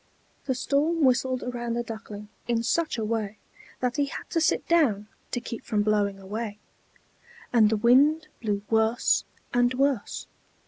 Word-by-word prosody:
The 260 - 0
storm 300 +5 +1
whistled 255 0 +2
around 240 -1 -3
the 240 - -1
Duckling 215 -2 -8 0.2
in 235 -1 +1
such 320 +4 0
a 220 - -1
way 215 -2 -2 0.4
that 250 +1 0
he 285 - +3
had 280 - -7
to 330 - +1
sit 315 - +1
down 245 -12 +3 0.2
to 245 - -2
keep 235 -1 -7
from 210 -1 0
blowing 205 -2 +1
away; 205 +2 -5 1.0
and 220 -3 +6
the 220 - +1
wind 285 +8 +4
blew 205 -3 -1
worse 220 +1 +3 0.3
and 245 0 +3
worse. 270 -4 0
235 Hz, 155 wpm, -26 LUFS, 215-265 Hz, 1.0 s, and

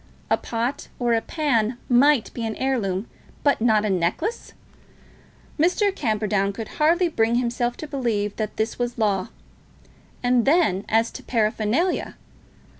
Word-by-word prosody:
A - - +5
pot 235 +4 -3
or 240 -1 +1
a 225 - +2
pan 240 -7 0
might 260 0 +4
be 235 - -5
an 220 -1 -2
heirloom, 225 -7 -1 0.4
but 285 -5 +2
not 220 -2 +3
a - - 0
necklace! 185 - -2 1.1
Mr. 380 +5 +2
Camperdown 210 - 0
could 220 +1 -6
hardly 340 +4 +4
bring 230 -7 +1
himself 240 0 -1
to 310 - -6
believe 225 -8 -1
that 215 -1 -4
this 220 +2 -2
was 245 0 -2
law. 200 -4 +1 1.0
And 245 -1 +3
then 270 - +2
as 225 +1 +2
to - - -9
paraphernalia! 230 - 0
235 Hz, 140 wpm, -23 LUFS, 215-270 Hz, 1.1 s, A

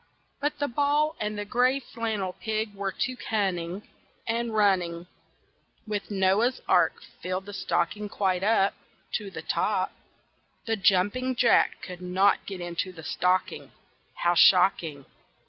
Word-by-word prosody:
But 295 +1 -1
the 290 - -1
ball 290 +4 +1
and 210 0 -3
the 205 - -3
gray 250 +5 +2
flannel 220 -7 -3
pig 220 0 -3
were 195 -1 -3
too 255 +5 -2
cunning, 190 -5 -2 0.4
And 230 0 -1
running, 180 -5 +1 0.8
With 210 -2 -4
Noah's 200 +5 +2
Ark, - - +4 0.3
filled 185 +1 -3
the 205 - -9
stocking 200 +3 -1
quite 190 -3 0
up 200 -2 +3 0.4
To 205 -2 -8
the - - -8
top. - - 0 0.7
The 225 -2 0
jumping 205 +7 +2
jack 240 -1 +3
could 180 -1 -8
not 185 +2 +2
get 190 -3 -6
into 175 +1 -3
the 165 -3 -12
stocking. 180 +4 -1 0.5
How 175 - +4
shocking! 170 -6 +4
200 Hz, 135 wpm, -27 LUFS, 185-230 Hz, 0.8 s, Ark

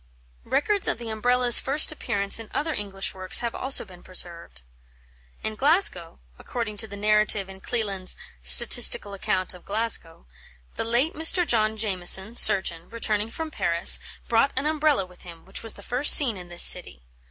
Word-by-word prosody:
Records 400 +7 -1
of - - -2
the 235 -1 -9
Umbrella's 245 +2 +3
first 290 +4 +2
appearance 205 -9 -1
in 225 - -12
other 310 +2 -3
English 195 -4 -4
works 185 -1 0
have 235 -1 -5
also 265 -2 -1
been 180 -3 -17
preserved. 170 - -6 0.8
In 220 - -3
Glasgow 260 - +1 0.2
(according 225 -4 -7
to 220 - -1
the 200 -1 -11
narrative 210 -1 -1
in 190 0 -14
Cleland's 200 -6 -1 0.2
"Statistical 65 - +4
Account 185 -1 -4
of 180 - -16
Glasgow 205 - -3 0.2
") - - -32
"the - - -4
late 240 +7 -2
Mr. 325 +3 +2
John 220 -5 -1
Jamieson, 190 +1 +2
surgeon, 185 -5 +2
returning 220 -2 -3
from 320 +6 -8
Paris, 170 - +3 0.3
brought 235 +4 +1
an 265 +2 -3
Umbrella 305 -8 -1
with 180 -1 -20
him, 170 -2 -14
which 190 - -8
was 225 - -4
the 200 - -14
first 250 +7 +5
seen 255 -7 +3
in 180 -2 -12
this 175 0 +2
city. - - +4
215 Hz, 170 wpm, -23 LUFS, 185-245 Hz, 0.8 s, first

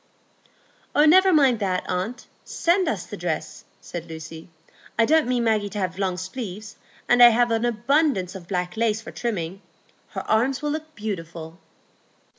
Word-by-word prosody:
"Oh, 295 - +6
never 375 +4 +6
mind 270 -8 +4
that, 185 -3 -1
aunt; 190 +7 -3 0.2
send 350 +1 +1
us - - -2
the - - -8
dress," - - -4
said 170 -1 -8
Lucy. 160 +1 -9 0.5
"I 230 - +5
don't 315 +1 +3
mean 245 -1 +1
Maggie 215 -3 +1
to 210 - -7
have 185 -1 -3
long 185 -2 -1
sleeves, 205 +1 -6 0.3
and 245 0 +4
I 240 - +11
have 240 +1 +2
abundance 235 - +1
of 185 -3 -10
black 180 0 -2
lace 220 -1 +1
for 225 - -10
trimming. 195 -5 -4 0.5
Her - - -5
arms 255 +6 +1
will 295 - 0
look 310 +1 -6
beautiful." 165 -5 -6
220 Hz, 160 wpm, -24 LUFS, 185-255 Hz, 0.5 s, I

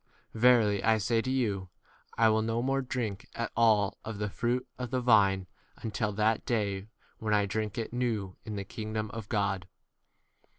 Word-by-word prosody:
Verily 110 -3 +4
I 110 0 +4
say 115 +2 +1
to 130 - -4
you, 105 -8 0 0.5
I 115 - +5
will 110 0 +3
no 115 +2 -1
more 135 +1 +1
drink 120 -6 -3
at 115 -1 -3
all 110 -4 +3
of 110 -2 -5
the 105 -1 -2
fruit 125 +4 -1
of 125 -1 -3
the 130 +1 0
vine 100 -6 +4 0.3
until 110 -1 -2
that 110 +2 +1
day 100 -5 -1 0.3
when 110 -1 +1
I 105 -1 +3
drink 105 +1 -3
it 115 0 -3
new 115 -6 -1
v - - -17
in 110 - -5
the 100 - -3
kingdom 110 -1 -4
29 115 - -6
of 100 - -10
God. 100 -4 0
110 Hz, 185 wpm, -30 LUFS, 100-120 Hz, 0.5 s, I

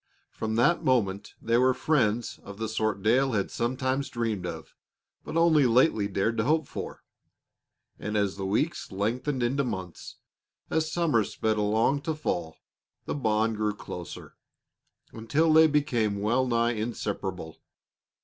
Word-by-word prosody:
From 110 0 -3
that 125 +9 +3
moment 100 -7 0
they 115 +1 +1
were 130 0 +4
friends 120 -6 0
of 100 0 -10
the 110 0 -3
sort 110 -2 -1
Dale 130 +4 +3
had 100 -2 -1
sometimes 130 +3 -1
dreamed 115 -5 -2
of, - - -8 0.5
but 160 - -4
only 160 -5 +5
lately 115 -3 +3
dared 100 +3 -1
to 115 - +2
hope 155 +4 +2
for. - - -7 1.0
And 105 +1 -2
as 100 -2 0
the 95 -1 -4
weeks 135 - -1
lengthened 120 +7 -1
into 135 +4 +1
months, 95 -8 -6 0.6
as 160 0 0
summer 155 -10 +2
sped 110 +1 -1
along 110 +7 +2
to 160 +1 -2
fall, 85 - -3 0.5
the - - -2
bond 110 -4 0
grew 105 -1 0
closer, 90 -4 -8 0.8
until 145 +9 +1
they 160 0 +7
became 120 -9 +1
well 120 +6 +1
nigh 115 -1 +2
inseparable. 105 -7 -4
115 Hz, 145 wpm, -27 LUFS, 105-135 Hz, 1.0 s, they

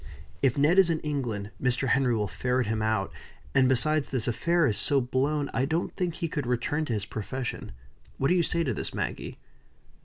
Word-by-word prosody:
If 135 -2 +2
Ned 155 +7 +5
is 190 -3 +6
in 160 -1 +1
England, 120 -9 -3
Mr. 125 +1 +1
Henry 125 -1 +3
will 105 -2 0
ferret 125 +7 0
him 110 +1 -1
out. 110 -3 0 0.4
And, 130 -2 +4
besides, 150 +3 +2
this 130 -5 -1
affair 170 +8 +2
is 110 -7 +1
so 140 +7 +1
blown, 140 +3 0
I 130 +3 +1
don't 160 +4 -1
think 175 -3 -1
he 170 - -2
could 150 -5 -3
return 125 +6 0
to 120 - -2
his 105 -3 -2
profession. 125 +5 -5 0.5
What 135 - +1
do - - +4
you 180 - +4
say 170 0 +1
to 130 -6 -1
this, - - -5
Maggie?" - - -4
130 Hz, 205 wpm, -28 LUFS, 120-155 Hz, 0.5 s, is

